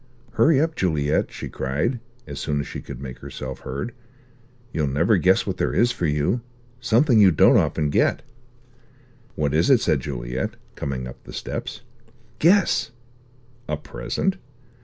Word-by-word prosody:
"Hurry 140 +5 +4
up, 160 +1 +1
Juliet," 75 -5 0
she - - -6
cried, 75 - -2 0.3
as 70 -1 -7
soon 75 -1 -1
as 70 - -2
she - - -7
could - - -9
make 65 -2 -8
herself 65 -1 -7
heard. 70 - -5 0.8
"You'll 75 -2 0
never 85 +10 +3
guess 90 +2 +3
what - - -3
there - - -1
is 120 +1 +4
for 85 - -1
you. 75 +11 0 0.4
Something 120 -1 +4
you 100 - +8
don't 80 - +5
often 75 -2 +2
get!" - - +2 1.1
"What 75 -2 0
is 80 - +3
it?" 130 -4 +6
said 75 - +1
Juliet, 60 -2 -4 0.2
coming 65 -3 -4
up 65 - -11
the - - -11
steps. - - -5 0.6
"Guess!" 170 - +4 0.8
"A - - 0
present?" 185 - -2
75 Hz, 155 wpm, -23 LUFS, -, 1.1 s, you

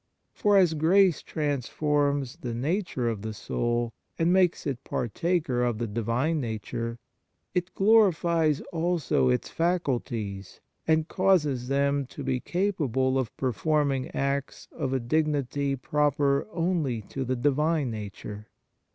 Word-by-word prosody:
For 205 -1 +3
as 180 -4 +5
grace 175 +3 +4
transforms 145 -1 -1
the 120 -2 -5
nature 145 - -1
of 110 -3 -2
the 110 0 -5
soul, 120 +2 -1 0.2
and 170 +2 +3
makes 185 -2 +3
it 135 -2 -3
partaker 130 +1 -1
of 120 -3 0
the 120 - -2
Divine 115 +9 0
Nature, 115 0 -4 0.6
it 180 0 -2
glorifies 170 -7 +3
also 165 - +1
its 60 - 0
faculties, 120 - -2 0.3
and 160 0 +3
causes 155 -11 +2
them 140 0 +1
to 140 - -8
be 130 -1 0
capable 135 - 0
of 125 -4 -4
performing 135 +1 0
acts 140 0 -2
of 130 - -3
a 135 - +1
dignity 140 0 0
proper 140 +1 +1
only 165 - 0
to 135 +6 -5
the 130 0 -1
Divine 145 +2 +1
Nature. 105 0 -7
140 Hz, 125 wpm, -27 LUFS, 120-165 Hz, 0.6 s, as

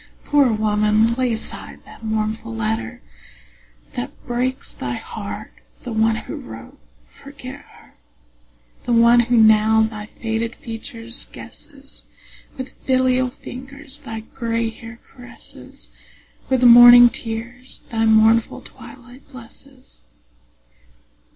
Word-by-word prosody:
Poor 285 -4 +3
woman, 215 +1 +2
lay 250 0 0
aside 220 0 -5
the - - -15
mournful 215 - -3
letter 110 - -3 0.9
That 125 - -5
breaks 250 +2 -3
thy - - -5
heart; - - -7 0.3
the 245 - -6
one 220 0 +2
who - - -7
wrote, 115 0 -11 0.4
forget - - -10
her: - - -21 0.9
The 240 - 0
one 235 +1 +6
who 240 0 +2
now 220 0 +5
thy 215 -1 -5
faded 225 +1 -4
features 230 +1 -6
guesses, 280 -1 -13 0.5
With 260 0 -6
filial 255 -1 +2
fingers 270 +3 -9
thy 225 -6 -7
gray 230 -1 -3
hair 230 +1 -12
caresses, 245 -1 -14 0.6
With 260 -1 +1
morning 240 0 +9
tears 235 +3 -6
thy 225 -1 0
mournful 220 +1 +3
twilight 250 +1 -14
blesses. 260 +1 -16
230 Hz, 110 wpm, -20 LUFS, 220-250 Hz, 0.9 s, morning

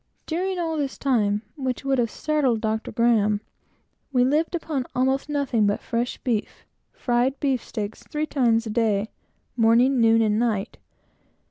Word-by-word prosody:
During 370 +3 -2
all 325 -2 -2
this 280 -2 -2
time, 210 -6 +1
which 260 -2 -3
would 270 -1 +1
have 230 -2 +1
startled 280 -4 0
Dr. 220 0 -2
Graham 215 -3 +2 0.7
we 250 -2 +3
lived 305 +7 +1
upon 300 -6 -3
almost 265 +3 +1
nothing 265 -7 +1
but 205 - 0
fresh 240 0 -2
beef; 230 -5 -3 0.3
fried 250 +2 0
beefsteaks, 230 -6 -2
three 305 +1 -1
times 235 -6 +1
a 220 - -4
day, 215 -2 0 0.4
morning, 240 +3 +4
noon, 225 0 +5
and 215 0 +1
night. 225 -3 -1
245 Hz, 145 wpm, -24 LUFS, 225-275 Hz, 0.7 s, noon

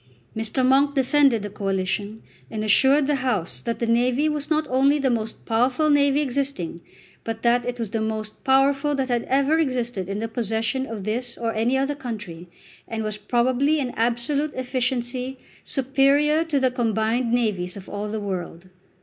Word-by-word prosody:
Mr. 225 +4 0
Monk 280 +2 +4
defended 270 -4 +3
the 205 - -4
Coalition, 200 +2 -2 0.3
and 215 -1 -4
assured 270 +7 +4
the 290 0 +1
House 240 -10 -1
that 235 -1 -3
the 235 - -1
navy 245 +5 +2
was 300 -1 -2
not 310 -1 +1
only 275 +3 +3
the 270 -3 +1
most 225 -2 -3
powerful 250 +7 +2
navy 285 0 +3
existing, 265 - -3 0.4
but 225 0 -5
that 240 0 +2
it 245 0 -3
was 225 -4 -4
the 225 -1 -1
most 220 -1 -4
powerful 275 +2 +3
that 265 -2 -1
ever 275 +6 +2
had - - +4
existed 240 -7 -3
in 200 - -2
the 225 +2 -2
possession 225 +3 -1
of 220 -4 -6
this 240 +4 -3
or 230 -1 -2
any 230 +4 +1
other 275 +2 0
country, 210 - -7 0.4
and 225 -1 -3
was 215 -1 -3
probably 255 +7 +1
in 255 -3 -2
absolute 245 +6 0
efficiency 255 0 -2 0.3
superior 280 +3 +2
to 315 -4 0
the 260 -1 +2
combined 230 0 0
navies 205 -7 0
of 195 - -10
all 205 +1 -4
the 215 +1 -3
world. 185 -3 -5
245 Hz, 175 wpm, -23 LUFS, 220-275 Hz, 0.4 s, Monk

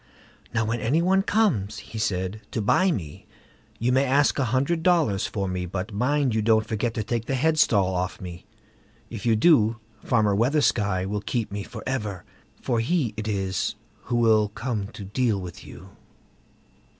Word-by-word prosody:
"Now, 115 -1 0
when 115 +2 -1
any 135 +9 +1
one 190 +3 +3
comes", 160 - +1
he 110 - -8
said, 95 +1 -2
"to - - -3
buy 185 - +3
me, 85 - -5 0.5
you 120 +2 0
may 130 +2 +3
ask 140 +2 +2
a 135 - +2
hundred 140 +8 0
dollars 160 - +2
for 100 -2 -3
me; 90 -1 -3
but 100 +4 -5
mind 130 +4 +1
you 110 - +1
don't 110 0 +3
forget 110 +1 -2
to 110 - -1
take 115 +1 -2
the 135 - -1
headstall 125 -10 +3
off 90 0 -2
me; 90 -1 -9 0.6
if 115 0 -5
you 115 - +4
do, 115 -3 +4 0.3
Farmer 110 -4 +2
Weathersky 105 -6 +1
will 105 +1 -3
keep 115 -1 -2
me 100 0 -4
for - - -8
ever, 105 -8 -3 0.4
for 120 -3 -1
he 125 -2 0
it 110 0 -5
is 95 -3 -1 0.3
who 125 - -2
will 110 -3 +4
come 110 -2 -3
to 105 -1 -10
deal 110 0 0
with 90 -2 -8
you." - - -12
110 Hz, 175 wpm, -25 LUFS, 100-130 Hz, 0.6 s, you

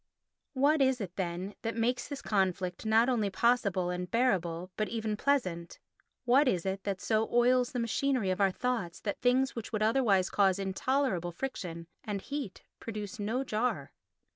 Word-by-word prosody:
What 285 +3 +3
is 260 -1 +3
it, 185 -4 -6
then, 185 +1 -3
that 225 0 -3
makes 245 +2 0
this 285 -1 -6
conflict 190 -1 -1
not 225 +2 +4
only 230 -6 +1
possible 195 -4 +1
and 180 0 -4
bearable 185 -7 0
but 215 - -1
even 220 -2 -2
pleasant? 185 -10 -1 0.5
What 265 +4 +5
is 180 -7 +1
it 195 0 -2
that 195 -2 -2
so 220 +1 0
oils 245 +1 +3
the 250 - -4
machinery 235 -2 0
of 185 - -1
our 195 - +5
thoughts 210 -4 -2
that 205 - -4
things 255 +2 +2
which 230 -2 -6
would 215 -1 0
otherwise 215 -5 +3
cause 195 -2 +3
intolerable 195 -1 0
friction 170 -6 -5 0.2
and 205 -2 -3
heat 280 -2 -6 0.2
produce 210 -3 -6
no 225 +6 -1
jar? 215 - -1
215 Hz, 165 wpm, -31 LUFS, 185-250 Hz, 0.5 s, What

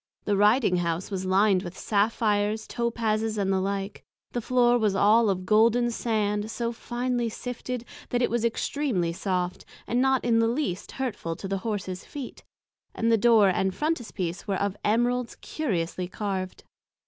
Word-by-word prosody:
The 205 - +2
Riding 210 -1 +4
House 170 +2 -2
was 190 -1 -3
lined 190 0 +4
with 180 -1 -8
Saphirs, 210 0 +1
Topases, 225 -2 -1
and 195 -1 +1
the 190 - +2
like; 195 +1 -3 0.3
the 240 - -2
Floor 245 0 +3
was 210 -3 +1
all 215 +3 +5
of 185 -1 -1
Golden 230 +4 +4
Sand 210 -2 -1
so 235 +1 -2
finely 240 0 -2
sifted, 245 +1 -5 0.2
that 245 - 0
it 245 - +1
was 235 -1 0
extreamly 230 - 0
soft, 180 -1 -2 0.2
and 245 +2 +1
not 265 -1 +2
in 230 -1 +3
the 230 - +3
least 230 - -2
hurtful 235 -11 -3
to 195 - -6
the 195 0 -2
Horses 190 -3 -4
feet, 280 -4 -8 0.5
and 230 0 +1
the - - +6
Door 220 -2 +5
and 190 0 0
Frontispiece 220 - -3
was 195 -2 0
of 200 -1 -1
Emeralds 240 +3 +1
curiously 185 - -3
carved. 190 -1 -4
215 Hz, 160 wpm, -26 LUFS, 195-240 Hz, 0.5 s, the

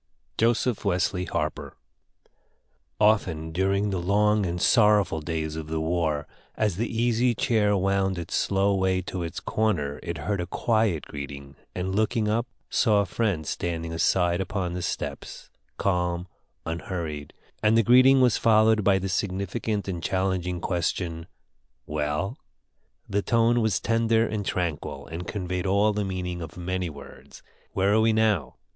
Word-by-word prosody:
JOSEPH 115 0 +1
WESLEY 90 -1 0
HARPER 75 -4 -3 1.2
Often 90 -7 +2
during 100 +4 +1
the 95 - -1
long 105 +2 +2
and 85 +1 -3
sorrowful 105 -7 +4
days 80 -1 -3
of 80 -1 -5
the 80 0 -2
war, 80 -2 0 0.3
as 105 -5 0
the 115 +3 -1
Easy 120 +1 +1
Chair 105 -3 +2
wound 95 0 +1
its 85 - -6
slow 100 +1 +2
way 95 -1 +1
to 90 0 -5
its 85 -1 -4
corner, 75 -10 -1
it 85 -1 -4
heard 90 +7 -2
a 90 - -4
quiet 110 -5 0
greeting, 70 -1 -8 0.2
and, 90 +1 -2
looking 110 +2 +1
up, 115 +3 0 0.2
saw 105 -4 +3
a - - -1
friend 95 -5 -1
standing 85 +1 -3
aside 85 +2 +2
upon 95 -2 -3
the 90 - -4
steps, - - -5 0.3
calm, 90 -2 0 0.4
unhurried, 80 -3 -4 0.3
and 110 +1 +4
the 115 - +5
greeting 130 +3 +6
was 125 -3 +3
followed 110 -1 +4
by 95 -1 +4
the 95 0 -3
significant 100 +2 -2
and 90 -3 -3
challenging 95 -1 -1
question, 85 -1 -2 0.6
"Well?" 75 - -2 0.7
The 100 +1 0
tone 115 +2 +2
was 110 -4 +1
tender 115 0 +2
and 105 -2 -3
tranquil, 75 -6 -3
and 85 +3 -7
conveyed 90 -2 -3
all 100 +2 +3
the 105 0 -1
meaning 90 -2 -4
of 80 +1 -8
many 90 0 -2
words: 70 -3 -13 0.3
"Where 100 +2 +2
are 110 - +4
we 110 0 +3
now? 110 -10 +1
95 Hz, 150 wpm, -26 LUFS, 85-105 Hz, 1.2 s, greeting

